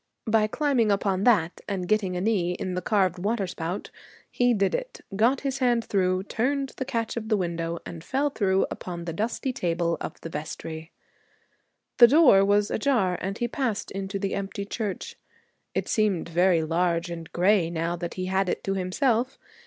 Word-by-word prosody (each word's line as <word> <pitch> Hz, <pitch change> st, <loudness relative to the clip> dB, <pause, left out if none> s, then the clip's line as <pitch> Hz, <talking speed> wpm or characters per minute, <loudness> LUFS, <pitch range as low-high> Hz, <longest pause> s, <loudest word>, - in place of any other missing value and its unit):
By 220 Hz, -1 st, +3 dB
climbing 250 Hz, -4 st, +1 dB
upon 195 Hz, -1 st, +1 dB
that 185 Hz, -9 st, +3 dB
and 185 Hz, -3 st, -2 dB
getting 195 Hz, -3 st, +1 dB
a -, -, -2 dB
knee 190 Hz, -4 st, +1 dB
in 185 Hz, +1 st, -4 dB
the 180 Hz, -, -2 dB
carved 185 Hz, -4 st, +1 dB
water 205 Hz, +2 st, 0 dB
spout 175 Hz, +1 st, -5 dB, 0.4 s
He 245 Hz, 0 st, +2 dB
did 200 Hz, -1 st, +1 dB
it, -, -, -4 dB
got 240 Hz, +6 st, +3 dB
his 270 Hz, -2 st, -2 dB
hand 240 Hz, -3 st, +2 dB
through, 185 Hz, -1 st, +1 dB
turned 270 Hz, +6 st, -1 dB
the 260 Hz, -, -2 dB
catch 230 Hz, -3 st, -2 dB
of 220 Hz, -1 st, -4 dB
the 215 Hz, -, +3 dB
window, 170 Hz, -2 st, -2 dB
and 165 Hz, -2 st, -8 dB
fell 280 Hz, +7 st, 0 dB
through 195 Hz, -6 st, +2 dB
upon 175 Hz, -2 st, -6 dB
the 165 Hz, -, -4 dB
dusty 230 Hz, +7 st, -2 dB
table 170 Hz, -4 st, 0 dB
of -, -, -6 dB
the 165 Hz, -, -6 dB
vestry. 160 Hz, +1 st, -6 dB, 1.1 s
The 240 Hz, -, +11 dB
door 270 Hz, -8 st, +6 dB
was 205 Hz, +1 st, +2 dB
ajar 220 Hz, -8 st, +1 dB
and 195 Hz, +2 st, -3 dB
he 240 Hz, -, -1 dB
passed 240 Hz, -3 st, -2 dB
into 195 Hz, +1 st, -4 dB
the 195 Hz, 0 st, -2 dB
empty 200 Hz, 0 st, -4 dB
church. 205 Hz, -2 st, -4 dB, 0.6 s
It -, -, -1 dB
seemed 205 Hz, -6 st, +1 dB
very 175 Hz, 0 st, +3 dB
large 170 Hz, +1 st, 0 dB
and 165 Hz, 0 st, -7 dB
gray 180 Hz, -1 st, +3 dB
now 170 Hz, 0 st, -2 dB
that 170 Hz, 0 st, -5 dB
he 185 Hz, -, -3 dB
had 190 Hz, 0 st, +1 dB
it -, -, -2 dB
to 195 Hz, -, -1 dB
himself. 230 Hz, +7 st, 0 dB
195 Hz, 185 wpm, -26 LUFS, 175-225 Hz, 1.1 s, The